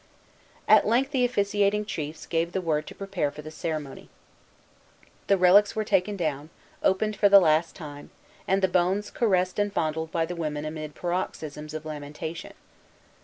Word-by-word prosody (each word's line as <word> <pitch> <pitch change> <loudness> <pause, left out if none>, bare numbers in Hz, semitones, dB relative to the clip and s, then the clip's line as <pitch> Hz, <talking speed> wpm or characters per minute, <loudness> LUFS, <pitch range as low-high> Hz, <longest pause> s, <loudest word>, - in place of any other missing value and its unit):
At - - +6
length 255 +5 +2
the 260 -3 +1
officiating 205 -2 +1
chiefs 155 -6 -5
gave 165 +1 -1
the - - 0
word 155 -4 -1
to - - -9
prepare 195 -7 -2
for 150 +1 -10
the 155 - -8
ceremony. 155 -4 -5 1.2
The 200 - +4
relics 190 +3 +5
were 215 - 0
taken 200 0 +1
down, 155 -3 -3 0.3
opened 210 +3 +1
for 205 - +4
the 200 0 +9
last 160 -1 +2
time, 145 -4 -9 0.4
and 190 +1 +1
the - - +5
bones 185 +3 0
caressed 185 -4 +1
and 205 0 +1
fondled 160 -2 -2
by 165 -1 0
the 175 +2 -6
women 155 -3 -3
amid 155 -1 -6
paroxysms 155 -4 -4
of 155 0 -6
lamentation. 150 +2 -7
175 Hz, 165 wpm, -26 LUFS, 155-200 Hz, 1.2 s, the